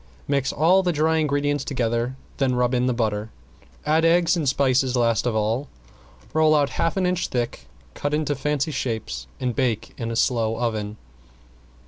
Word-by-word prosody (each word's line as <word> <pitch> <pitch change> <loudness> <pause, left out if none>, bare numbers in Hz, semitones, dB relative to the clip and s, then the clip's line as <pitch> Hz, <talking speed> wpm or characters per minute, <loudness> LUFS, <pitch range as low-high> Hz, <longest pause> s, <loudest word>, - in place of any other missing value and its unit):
Mix 140 -1 +1
all 175 +5 +4
the 180 -2 +1
dry 160 +1 +2
ingredients 145 -2 0
together, 120 -2 -1 0.2
then 130 -2 +1
rub 125 0 +1
in 125 0 +2
the - - +2
butter, 110 -2 -1 0.6
add 155 +2 +3
eggs 170 +1 +4
and 155 -6 +1
spices 130 -1 +2
last 115 -1 +2
of 115 - 0
all, 110 +6 0 0.7
roll 155 0 +4
out 145 -2 +2
half 165 - -1
an 190 - +2
inch 180 0 0
thick, 120 -2 -3 0.3
cut 145 - -3
in 150 +1 0
fancy 145 +1 -1
shapes 110 - -3
and 125 -2 -2
bake 120 -4 -1
in 115 - -3
a 115 - -3
slow 115 -2 +1
oven. 110 -3 -2
130 Hz, 170 wpm, -23 LUFS, 115-150 Hz, 0.7 s, all